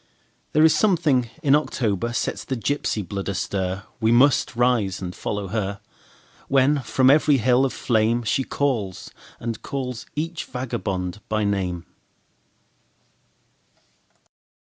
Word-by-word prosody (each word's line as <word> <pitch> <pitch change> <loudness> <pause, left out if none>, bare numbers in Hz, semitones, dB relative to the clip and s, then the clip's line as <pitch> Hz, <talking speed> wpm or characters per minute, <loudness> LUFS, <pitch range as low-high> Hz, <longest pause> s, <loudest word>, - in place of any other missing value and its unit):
There 155 +1 +5
is 160 - +6
something 155 - +2
in 140 -2 +4
October 120 -7 0
sets 120 - -2
the 130 - -3
gypsy 115 -6 -1
blood 100 +2 -4
astir; 95 0 -2 0.2
We 110 0 +2
must 130 +1 +4
rise 115 -6 +1
and 90 -1 -5
follow 100 -2 -4
her, 100 -2 -2 0.7
When 140 +2 +3
from 130 +2 +3
every 150 -1 +4
hill 125 +2 +3
of 135 - -1
flameShe 115 +2 0
calls 115 -10 -2 0.3
and 115 -1 -4
calls 125 -3 -5
each 165 +2 -3
vagabond 105 -7 -4
by 110 0 0
name. 95 -4 -1
120 Hz, 120 wpm, -23 LUFS, 100-135 Hz, 0.7 s, is